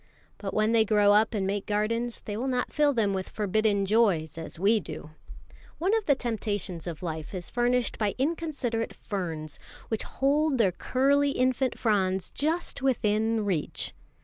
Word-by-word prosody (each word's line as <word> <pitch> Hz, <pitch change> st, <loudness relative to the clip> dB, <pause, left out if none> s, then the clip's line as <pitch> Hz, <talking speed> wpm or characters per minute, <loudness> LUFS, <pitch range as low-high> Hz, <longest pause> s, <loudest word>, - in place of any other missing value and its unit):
But 195 Hz, -2 st, -5 dB
when 215 Hz, +1 st, +2 dB
they 230 Hz, -1 st, +5 dB
grow 205 Hz, -1 st, +4 dB
up 220 Hz, +2 st, +3 dB
and 195 Hz, -2 st, 0 dB
make 200 Hz, +1 st, -2 dB
gardens, 230 Hz, +3 st, -1 dB
they 205 Hz, -, -4 dB
will 245 Hz, +5 st, -2 dB
not 250 Hz, -1 st, -1 dB
fill 295 Hz, -1 st, +3 dB
them 220 Hz, -6 st, +1 dB
with 190 Hz, -1 st, -3 dB
forbidden 210 Hz, -1 st, +1 dB
joys 195 Hz, -7 st, +2 dB
as 165 Hz, -1 st, -7 dB
we 205 Hz, +5 st, +3 dB
do. 155 Hz, -3 st, -8 dB, 0.7 s
One 375 Hz, +7 st, +2 dB
of 445 Hz, -2 st, -1 dB
the 285 Hz, -, +5 dB
temptations 205 Hz, -, -3 dB
of 170 Hz, 0 st, -6 dB
life 160 Hz, +1 st, -5 dB
is 180 Hz, -2 st, -4 dB
furnished 245 Hz, 0 st, +1 dB
by 210 Hz, -2 st, 0 dB
inconsiderate 275 Hz, -6 st, -2 dB
ferns, 165 Hz, -7 st, -5 dB, 0.3 s
which 220 Hz, -, -1 dB
hold 285 Hz, +1 st, +1 dB
their 210 Hz, -6 st, +3 dB
curly 280 Hz, +8 st, +2 dB
infant 255 Hz, 0 st, +1 dB
fronds 190 Hz, -4 st, 0 dB
just 315 Hz, +2 st, -1 dB
within 220 Hz, -4 st, +1 dB
reach. 175 Hz, -7 st, -2 dB
220 Hz, 165 wpm, -27 LUFS, 195-255 Hz, 0.7 s, they